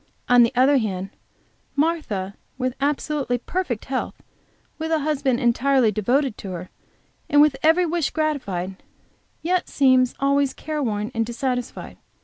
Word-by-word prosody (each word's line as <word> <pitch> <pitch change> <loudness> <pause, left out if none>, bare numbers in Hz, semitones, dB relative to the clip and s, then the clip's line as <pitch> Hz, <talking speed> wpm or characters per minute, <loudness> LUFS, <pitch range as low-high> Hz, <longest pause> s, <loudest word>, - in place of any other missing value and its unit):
On 245 0 +6
the 235 - +4
other 265 +3 +5
hand, 195 -3 -3 0.6
Martha 280 - -1 0.2
with 255 -1 -1
absolutely 285 -3 0
perfect 250 - -3
health, 265 -1 -3 0.6
with 320 +1 -3
a 320 -1 +2
husband 275 -4 0
entirely 250 -1 +3
devoted 245 +4 0
to 190 -2 -6
her, 180 +1 -7 0.6
and 290 - +4
with 295 -2 +5
every 325 +3 +4
wish 335 -3 0
gratified, 200 - -2 0.7
yet 360 +2 0
seems 260 -2 +3
always 275 0 +2
careworn 240 -8 -3
and 225 - +1
dissatisfied. 245 +1 -4
265 Hz, 130 wpm, -23 LUFS, 230-295 Hz, 0.7 s, On